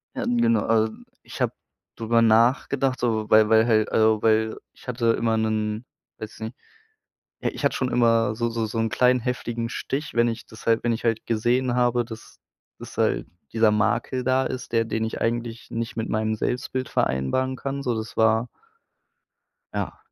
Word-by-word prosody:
Ja, - - -2
ähm, 245 -1 0
genau, 230 - +3
äh, - - -7 0.3
ich - - -10
habe - - +1 0.4
drüberr 115 0 +2
nachgedacht, 125 +4 +3
so, 110 -3 -1
weil 110 0 +6
weil 110 0 +5
halt, 110 -2 +2
äh 110 -1 +3
weil 110 0 +2 0.2
ich - - -19
hatte 120 -1 -1
immer 115 -1 +1
'nen 110 +1 -1 0.3
weiß 110 0 -9
nicht 110 +3 -5 0.9
ja, - - 0
ich - - -8
hatte - - +2
schon 130 -1 -1
immer 115 -2 +3
so 120 0 -1
so 115 -1 -2
so 110 +1 -3
'n 115 0 +1
kleinen 125 +2 +3
heftigen 120 -1 -3
Stich. 140 +4 -4
Wenn 120 0 +4
ich 115 -1 -4
das 110 - -13
halt 115 -1 +2
wenn 120 - +1
ich 115 - -5
halt 115 -2 0
gesehen 120 +3 +1
habe, 120 -1 +2
dass 115 -1 -11 0.4
das - - -10
halt - - +1 0.3
dieser 110 -1 +4
Makel 110 +5 0
da 130 +1 +2
ist, 130 -1 -5
der 115 -1 +2
den 110 0 -2
ich 110 - -5
eigentlich 115 0 -2
nicht 115 0 -4
mit 110 - -3
meinem 110 0 0
Selbstbild 130 +2 -2
vereinbaren 65 - 0
kann, 140 +1 -4
so 120 -3 0
das 110 0 -6
war 110 +2 +3 1.3
ja, - - -3
115 Hz, 185 wpm, -24 LUFS, 110-125 Hz, 1.3 s, weil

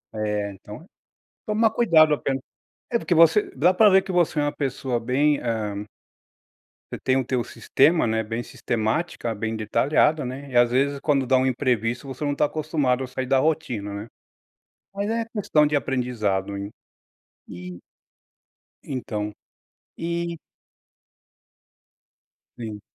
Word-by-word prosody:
É, 105 -1 -2
então 105 - -11
é - - -17 0.6
tomar 220 +1 +2
cuidado 165 -10 +5
apenas. 135 -2 -2 0.5
É 235 - +2
porque 175 - 0
você 165 +5 +5
dá 185 - +3
pra 210 +2 +6
ver 190 - +6
que - - -8
você 175 -4 +1
é - - +1
uma 145 0 0
pessoa 130 -3 -2
bem, 140 +6 +2
eh 105 -3 -3 1.0
Você - - -5
tem 130 0 +2
o 130 - 0
teu 125 -1 -1
sistema, 160 +8 +2
né, 110 0 0
bem 115 +2 -4
sistemática, 120 +4 -2
bem 110 +1 -3
detalhado, 140 +7 +2
né, 135 +3 -6
e 125 - +1
às 120 -1 +5
vezes 140 +2 +1
quando 140 -2 +1
dá 130 +1 +3
um 130 - +2
imprevisto 125 -1 -1
você 135 +2 -6
não 145 0 0
tá - - +2
acostumado 145 -4 0
a - - -5
sair 130 +1 -4
da 135 +1 +3
rotina, 130 -9 -1
né. 100 +2 -6 0.9
Mas 200 +1 -2
é 230 0 0
questão 155 -8 +3
de 150 0 +1
aprendizado. 115 -7 -1 1.0
E 90 0 -9 1.0
então, 105 -6 -4 0.6
e 170 0 -3 2.2
Sim. 110 -3 -7
130 Hz, 145 wpm, -24 LUFS, 115-155 Hz, 2.2 s, pra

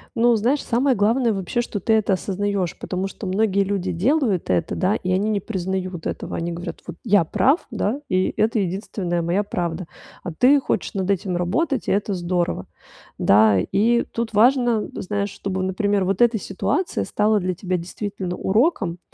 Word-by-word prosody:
Ну, 240 0 +4
знаешь, 245 +7 +1
самое 255 +2 +2
главное, 225 +3 +2
вообще, 195 +4 -1
что 220 -3 -4
ты 220 +4 +1
это 215 -2 +2
осознаёшь, 195 -1 -2
потому 185 +1 -3
что 195 +1 -7
многие 200 +1 +2
люди 190 -2 -2
делают 215 - +1
это, 90 -2 0
да, 190 +3 +1
и 185 -3 -3
они 195 +3 +1
не 210 -2 +1
признают 185 -3 -4
этого. - - -5
Они 170 +1 -3
говорят: 170 +1 -6
"Вот 175 - -6
я 205 -6 +4
прав, 275 - +2
да, 225 +4 -1
и 185 0 +1
это 225 +2 +2
единственная 185 -2 -2
моя 175 +5 0
правда". 175 -4 -3 0.4
А 180 - -4
ты 260 - +4
хочешь 265 - -2
над 190 -1 -2
этим 185 -1 -1
работать, 245 - -1
и - - +1
это 200 +1 0
здорово. 175 -1 -1 0.5
Да, 105 -1 +5
и 230 - +2
тут 230 -1 -4
важно, 240 0 +3
знаешь, 200 +1 -2
чтобы, 190 -1 -4
например, 195 +1 0
вот 195 +2 -1
эта 235 -2 +4
ситуация 270 - -1
стала 210 0 +2
для 185 -1 -1
тебя 180 0 -2
действительно 180 +1 -5
уроком, 195 - +1
200 Hz, 175 wpm, -22 LUFS, 180-225 Hz, 0.5 s, Да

